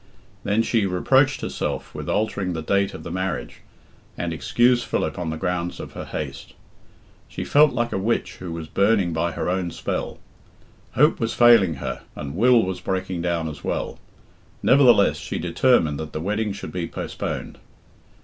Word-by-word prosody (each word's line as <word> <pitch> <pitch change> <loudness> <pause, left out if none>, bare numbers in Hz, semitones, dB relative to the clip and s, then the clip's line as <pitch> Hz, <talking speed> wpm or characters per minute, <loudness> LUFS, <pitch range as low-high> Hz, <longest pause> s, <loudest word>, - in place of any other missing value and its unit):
Then 105 +3 +2
she 110 -3 +1
reproached 135 +9 +2
herself - - -4
with - - -6
altering 100 -4 -1
the 80 -1 -4
date 100 +3 +1
of 80 - -9
the 85 - -6
marriage, 95 +1 -3 0.6
and 85 -1 -2
excused 120 +8 +2
Philip - - -2
on 85 -2 -2
the 80 - -3
grounds 90 0 -2
of - - -7
her - - -7
haste. 70 -2 -6 0.7
She - - -6
felt 150 +1 +5
like 120 0 -1
a - - -1
witch 115 +4 -1
who 90 -2 -7
was 80 -1 -5
burning 100 +1 +2
by 85 +1 -1
her - - -3
own 90 0 0
spell. - - -4 0.8
Hope 150 +4 +4
was 115 -1 -1
failing 115 -9 +6
her, 65 - -5
and 70 -1 -6
Will 120 +3 +5
was 95 0 -4
breaking 95 -2 -2
down 85 -2 -1
as 75 -1 -8
well. - - -3 0.6
Nevertheless, 125 -7 +5
she - - -5
determined 85 - +2
that 80 -1 -6
the - - -3
wedding 105 +5 -1
should 100 - -7
be 90 -2 -3
postponed. - - -5
95 Hz, 170 wpm, -23 LUFS, 85-115 Hz, 0.8 s, failing